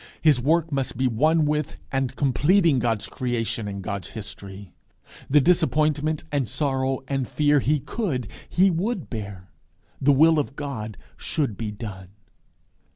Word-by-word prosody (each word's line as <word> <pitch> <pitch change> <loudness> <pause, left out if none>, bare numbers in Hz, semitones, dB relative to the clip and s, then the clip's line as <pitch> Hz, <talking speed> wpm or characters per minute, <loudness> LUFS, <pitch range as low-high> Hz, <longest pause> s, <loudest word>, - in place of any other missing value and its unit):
His 150 -6 +4
work 160 +4 +2
must 135 -4 -2
be 130 - +1
one 155 +7 +3
with 150 -1 -1
and 135 -1 -1
completing 150 +3 +3
God's 115 -3 0
Creation 115 -3 -2
and 100 -1 -5
God's 100 -2 -4
History. 100 -2 -8 0.6
The 150 +2 +6
disappointment 155 -2 +2
and 140 -5 0
sorrow 135 -1 0
and 135 -3 -1
fear 150 -1 +3
he 150 +3 +1
could, 140 - -3 0.2
he 190 +2 +4
would 185 +3 -2
bear. 100 -5 -7 0.5
The 145 - +5
will 155 +3 +5
of 140 -1 -3
God 110 -8 -5 0.2
should 140 -9 -1
be 110 +1 -4
done. 100 -3 -7
135 Hz, 145 wpm, -24 LUFS, 115-150 Hz, 0.6 s, The